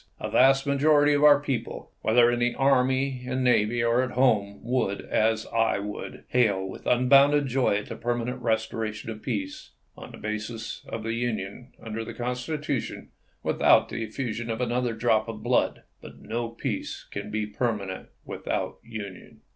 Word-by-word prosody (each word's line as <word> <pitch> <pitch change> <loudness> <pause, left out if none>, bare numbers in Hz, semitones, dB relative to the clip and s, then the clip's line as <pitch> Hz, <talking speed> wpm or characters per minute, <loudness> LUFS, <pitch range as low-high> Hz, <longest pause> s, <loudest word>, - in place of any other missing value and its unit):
A - - -4
vast 135 +2 +5
majority 145 +1 +4
of 145 0 +2
our 145 -1 +8
people, 140 -4 -4
whether 120 +2 +4
in 120 - -1
the 120 0 +1
army 130 -1 +2
and 130 0 -1
navy 120 -1 +2
or 115 +2 +3
at 130 -1 -3
home, 110 -6 +2
would, 120 -5 -1
as 110 0 +1
I 115 -3 +2
would, 105 +1 -6
hail 105 -6 +2
with 95 - -9
unbounded 140 +4 +5
joy 125 -5 +1
the 115 - -7
permanent 120 +2 -2
restora 110 -1 -1
tion 110 - -7
of 110 -1 -8
peace, 100 -7 -4 0.2
on - - -10
the - - -11
basis 110 +2 -5
of 115 - -5
the 115 +1 -2
Union 115 0 -4
under 115 0 -5
the - - -8
Con 125 +1 -2
stitution 140 +1 -4 0.3
without - - +4
the 115 - -4
effusion 115 0 -4
of 115 0 -2
another 125 -1 0
drop 110 -1 +2
of 110 -1 -7
blood. - - +1 0.2
But - - -12
no 115 +1 -3
peace 115 - -4
can 100 +1 -5
be 110 0 -1
permanent 105 -3 -3 0.2
without - - -3
union. 105 -5 -9
120 Hz, 170 wpm, -26 LUFS, 110-130 Hz, 0.3 s, our